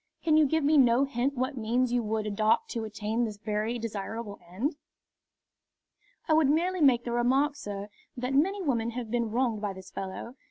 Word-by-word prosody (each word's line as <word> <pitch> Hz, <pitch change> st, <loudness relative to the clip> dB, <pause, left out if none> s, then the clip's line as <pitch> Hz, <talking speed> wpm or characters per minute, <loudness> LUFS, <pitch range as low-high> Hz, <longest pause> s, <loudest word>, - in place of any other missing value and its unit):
Can 315 Hz, -2 st, +3 dB
you 310 Hz, -1 st, +5 dB
give 320 Hz, +2 st, +1 dB
me 295 Hz, +1 st, +5 dB
no 245 Hz, 0 st, +5 dB
hint 275 Hz, 0 st, -1 dB
what 260 Hz, +3 st, -1 dB
means 240 Hz, +2 st, 0 dB
you 245 Hz, -, +2 dB
would 215 Hz, -1 st, -2 dB
adopt 215 Hz, +1 st, +1 dB
to 230 Hz, -2 st, -3 dB
attain 215 Hz, +2 st, -2 dB
this 215 Hz, -3 st, -3 dB
very 215 Hz, +2 st, -2 dB
desirable 220 Hz, -1 st, -5 dB
end?" 245 Hz, -, -2 dB, 1.5 s
"I 315 Hz, -, +3 dB
would 310 Hz, -3 st, +4 dB
merely 350 Hz, +4 st, +1 dB
make 250 Hz, -5 st, +5 dB
the 240 Hz, -, -4 dB
remark, 265 Hz, +5 st, +2 dB
sir, 205 Hz, -5 st, -6 dB, 0.3 s
that 250 Hz, +2 st, -2 dB
many 380 Hz, +8 st, +2 dB
women 235 Hz, -7 st, 0 dB
have 235 Hz, -3 st, -5 dB
been 235 Hz, -2 st, 0 dB
wronged 230 Hz, -2 st, 0 dB
by 205 Hz, -2 st, -2 dB
this 190 Hz, 0 st, -12 dB
fellow. 195 Hz, +6 st, -6 dB
240 Hz, 190 wpm, -28 LUFS, 215-275 Hz, 1.5 s, you